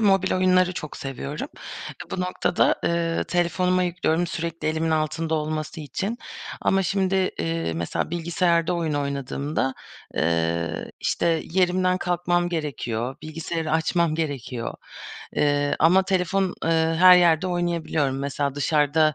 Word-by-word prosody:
mobil 195 -3 +3
oyunları 185 0 +3
çok 155 -4 -6
seviyorum. 135 - -5 0.6
Bu 185 - -3
noktada, 180 -1 +2
eee, 170 -1 0
telefonuma 180 +1 +1
yüklüyorum 175 -1 0
sürekli 165 -1 -3
elimin 160 +1 0
altında 160 +1 0
olması 155 +1 -3
için. 195 +10 -3 0.4
Ama 195 0 +2
şimdi, 190 0 0 0.2
eee, 80 0 -1
mesela 85 - -2
bilgisayarda 170 0 +1
oyun 165 -3 -1
oynadığımda, 140 -1 -2 0.4
eee, 85 +1 0
işte, 165 -2 +1
yerimden 185 +1 +2
kalkmam 175 0 0
gerekiyor, 130 -7 -3
bilgisayarı 160 +1 -4
açmam 160 0 +2
gerekiyor. 140 -7 -3 0.6
Eee, 145 -1 +2
ama 180 +5 +5
telefon, 190 0 0
ııı, 165 0 +2
her 180 +1 +9
yerde 170 -1 +4
oynayabiliyorum. 170 -6 0
Mesela 140 0 -2
dışarıda 150 +1 +2
165 Hz, 120 wpm, -24 LUFS, 145-180 Hz, 0.6 s, her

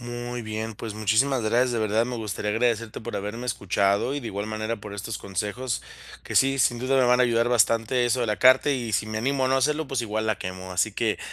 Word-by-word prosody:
Muy 120 0 -5
bien, 110 0 -4
pues, 110 0 -7
muchísimas 110 +5 +2
gracias. 120 +4 +2
De 115 - -1
verdad, 110 +1 +1
me 125 -1 -4
gustaría 105 -2 -3
agradecerte 115 0 0
por 120 +2 -7
haberme 105 +5 -5
escuchado. 100 +3 +1
Y, 145 - -3
de 120 - -7
igual 100 0 -4
manera, 110 +1 -3
por 105 -1 -8
estos 105 +1 -5
consejos 105 +5 -3 0.4
que - - -6
sí, 135 0 +4
sin 120 -2 +2
duda 130 +2 +1
me 130 - +4
van 125 +1 +4
a - - +6
ayudar 120 -1 +2
bastante 115 +1 +2
eso 120 +1 +1
de 120 - 0
la 105 -1 0
carta, 130 +3 +6
y 120 -5 -2
si 100 +2 +1
me 110 0 -3
animo 135 +3 0
a 130 - +1
no 130 - +2
hacerlo, 150 +3 +1
pues 135 -3 -2
igual 110 0 -2
la 110 - +1
quemo. 95 0 -6
Así 90 +5 +1
que, 110 +1 -1
115 Hz, 245 wpm, -25 LUFS, 105-125 Hz, 0.4 s, a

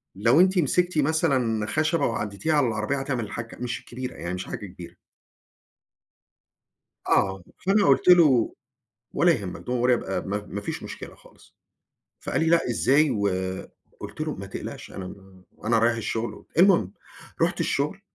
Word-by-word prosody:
لو 115 - +4
أنتِ 185 +1 +4
مسكتِ 175 +3 +1
مثلًا 135 -8 +1
خشبة 155 +4 +1
وعدِّيتيها 110 +6 -2
على 145 -4 +3
العربية 110 +4 -1
هتعمل 135 -3 -2
الحَكّة، 115 +2 -7
مش 120 -1 -3
الكبيرة، 125 +1 -7
يعني 85 - -5
مش 90 - -4
حاجة - - -6
كبيرة. 90 -2 -11 2.1
آه، 95 -1 +2 0.2
فأنا 200 +1 +4
قُلت - - +3
له: 150 -10 +6 0.6
"ولا 175 - +4
يهمك، 100 - -3
don't 125 -1 -1
worry 125 -1 +4
ab - - -9
آآ 95 - 0
ما 100 +1 -4
ما 100 - -4
فيش - - -5
مشكلة - - -8
خالص." - - -21 0.7
فقال - - -2
لي: 160 - +1
"لأ 170 -4 +3
إزاي؟ 140 +5 +3
و" 100 -4 +1 0.7
قُلت - - -9
له: 155 -1 -2
"ما 100 - -7
تقلقش 95 - -7
أنا 95 -1 -7 0.5
أنا 115 +1 +3
رايح 115 +1 +3
الشغل." 115 +1 -4
المهم، 175 - +5 0.5
رُحت - - +1
الشغل، - - -1
120 Hz, 155 wpm, -25 LUFS, 105-155 Hz, 2.1 s, له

